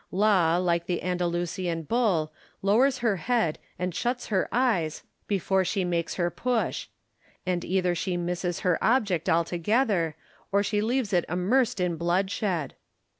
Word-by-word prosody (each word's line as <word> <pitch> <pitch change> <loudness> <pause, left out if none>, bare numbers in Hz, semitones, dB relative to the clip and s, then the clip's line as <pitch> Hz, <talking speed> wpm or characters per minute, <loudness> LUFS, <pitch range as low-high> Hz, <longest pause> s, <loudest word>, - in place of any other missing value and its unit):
Law, 185 -4 +3
like 170 -1 0
the 175 -2 -2
Andalusian 175 -1 -1
bull, 175 -7 +1 0.3
lowers 250 +7 +4
her 210 -4 +2
head 200 -3 0 0.2
and 180 0 -2
shuts 245 +6 -2
her 195 -4 +1
eyes 205 -11 +1 0.2
before 190 -1 +1
she 195 +1 -1
makes 170 -2 -1
her 175 -1 0
push; 245 -2 -1 0.6
and 180 -1 -1
either 180 -1 +1
she 180 +1 -2
misses 175 0 -2
her 180 -3 +1
object 205 -9 +2
altogether, 170 +1 +1 0.4
or 200 0 +3
she 205 0 0
leaves 230 -1 0
it 175 -2 +3
immersed 205 +7 +1
in 180 -2 0
bloodshed. 180 -1 0
180 Hz, 140 wpm, -27 LUFS, 175-210 Hz, 0.6 s, lowers